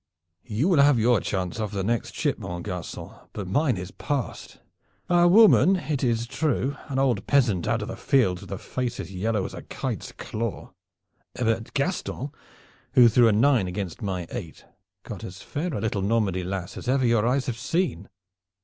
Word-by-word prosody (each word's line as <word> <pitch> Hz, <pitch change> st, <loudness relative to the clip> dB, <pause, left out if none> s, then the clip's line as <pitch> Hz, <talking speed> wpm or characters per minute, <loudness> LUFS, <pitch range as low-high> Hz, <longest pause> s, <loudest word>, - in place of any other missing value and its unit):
"You 115 Hz, +8 st, 0 dB
will 170 Hz, -7 st, +5 dB
have 140 Hz, -2 st, +5 dB
your 115 Hz, 0 st, +4 dB
chance 95 Hz, +1 st, -3 dB
off 110 Hz, -1 st, -1 dB
the 100 Hz, -2 st, -2 dB
next 115 Hz, +4 st, -1 dB
ship, 145 Hz, -6 st, 0 dB
mon 90 Hz, -4 st, -5 dB
garcon, 90 Hz, -5 st, -6 dB, 0.2 s
but 100 Hz, -3 st, -5 dB
mine 130 Hz, -, +1 dB
is 90 Hz, 0 st, -6 dB
passed. 140 Hz, -5 st, -4 dB, 0.5 s
A 175 Hz, 0 st, +5 dB
woman, 195 Hz, 0 st, +7 dB
it 150 Hz, -7 st, -2 dB
is 115 Hz, -2 st, +1 dB
true 140 Hz, +1 st, -1 dB
an 135 Hz, -, -3 dB
old 125 Hz, -7 st, +1 dB
peasant 115 Hz, -11 st, +2 dB
out 115 Hz, -1 st, 0 dB
of -, -, -6 dB
the -, -, -5 dB
fields, 95 Hz, -10 st, +2 dB
with -, -, -11 dB
a 100 Hz, -, -3 dB
face 125 Hz, +3 st, -4 dB
as 95 Hz, -, -6 dB
yellow 105 Hz, +1 st, -1 dB
as -, -, -6 dB
a -, -, -7 dB
kite's -, -, -5 dB
claw. 115 Hz, -2 st, -5 dB, 0.6 s
But 115 Hz, -1 st, -1 dB
Gaston, 140 Hz, -3 st, -2 dB, 0.6 s
who 120 Hz, -2 st, +7 dB
threw 120 Hz, +1 st, +5 dB
a -, -, +5 dB
nine 115 Hz, -1 st, +3 dB
against 90 Hz, 0 st, -5 dB
my 95 Hz, -4 st, -3 dB
eight, 95 Hz, -11 st, -7 dB, 0.4 s
got -, -, -8 dB
as 95 Hz, +1 st, -8 dB
fair 165 Hz, +5 st, -3 dB
a -, -, -3 dB
little 105 Hz, -3 st, -1 dB
Normandy 100 Hz, -3 st, +1 dB
lass 90 Hz, -1 st, -5 dB
as -, -, -8 dB
ever 130 Hz, 0 st, +2 dB
your 115 Hz, -1 st, +3 dB
eyes 130 Hz, +2 st, +1 dB
have 115 Hz, -3 st, -4 dB
seen. 160 Hz, -, -1 dB
115 Hz, 185 wpm, -25 LUFS, 100-135 Hz, 0.6 s, woman